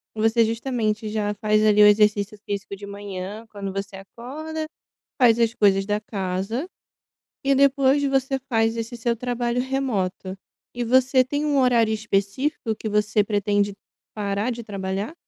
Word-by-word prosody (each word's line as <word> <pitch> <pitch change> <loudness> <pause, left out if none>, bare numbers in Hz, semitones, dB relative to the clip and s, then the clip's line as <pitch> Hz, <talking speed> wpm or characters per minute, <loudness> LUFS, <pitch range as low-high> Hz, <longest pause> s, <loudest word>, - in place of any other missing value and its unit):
Você 225 +1 +3
justamente 225 -2 -2
já 210 -1 -1
faz 215 -1 +3
ali 210 0 +5
o - - +9
exercício 210 0 +3
físico 200 0 -4
de 200 +1 -10
manhã, 200 +1 -7
quando 200 -2 -6
você 195 0 -5
acorda. 300 +11 -7 0.6
Faz 235 -2 +5
as 230 0 +2
coisas 195 -2 +3
da 210 0 0
casa, 200 - -3 0.8
E 275 0 +3
depois, 275 0 +4
você 270 0 +1
faz 225 -2 +1
esse 230 +1 -4
seu 235 0 -1
trabalho 245 0 -2
remoto. 205 -8 -2 0.4
E 240 0 -3
você 255 +2 +4
tem 290 +3 -2
um 290 -2 +1
horário 235 -4 +3
específico 220 +4 -1
que 220 - -6
você 210 0 +2
pretende 205 -1 0 0.4
parar 205 +3 -1
de 235 0 -6
trabalhar? 195 +2 -4
220 Hz, 150 wpm, -23 LUFS, 205-250 Hz, 0.8 s, o